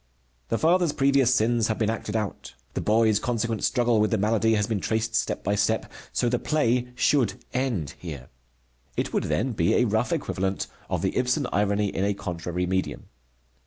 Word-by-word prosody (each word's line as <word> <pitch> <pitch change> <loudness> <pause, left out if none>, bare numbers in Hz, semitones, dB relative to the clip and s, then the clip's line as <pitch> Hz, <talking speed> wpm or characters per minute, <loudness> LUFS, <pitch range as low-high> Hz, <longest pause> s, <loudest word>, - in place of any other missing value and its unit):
The 115 - +1
father's 170 +1 +3
previous 135 -2 +3
sins 115 -2 +2
have 110 - -1
been 110 -1 +1
acted 115 -1 -4
out. 105 - -4 0.2
The - - -2
boy's 110 -1 +3
consequent 115 -2 -2
struggle 120 -3 +2
with 105 - +2
the 110 - +1
malady 110 +2 +2
has 105 -1 +1
been 110 -1 -1
traced 110 +2 -1
step - - -1
by 100 - 0
step, 105 +2 0 0.2
so 120 - 0
the 120 0 +1
play 125 -5 +1
should 125 -5 +2 0.2
end 120 - -1
here. 70 -8 -8 0.7
It - - -1
would - - 0
then 130 +4 0
be 85 -7 +1
a 125 - +4
rough 110 +6 0
equivalent 95 - -1 0.2
of - - -1
the - - 0
Ibsen 130 +3 +1
irony 100 0 +1
in 95 - -2
a 100 0 +1
contrary 90 -1 -3
medium. 95 +1 -2
110 Hz, 185 wpm, -26 LUFS, 100-125 Hz, 0.7 s, a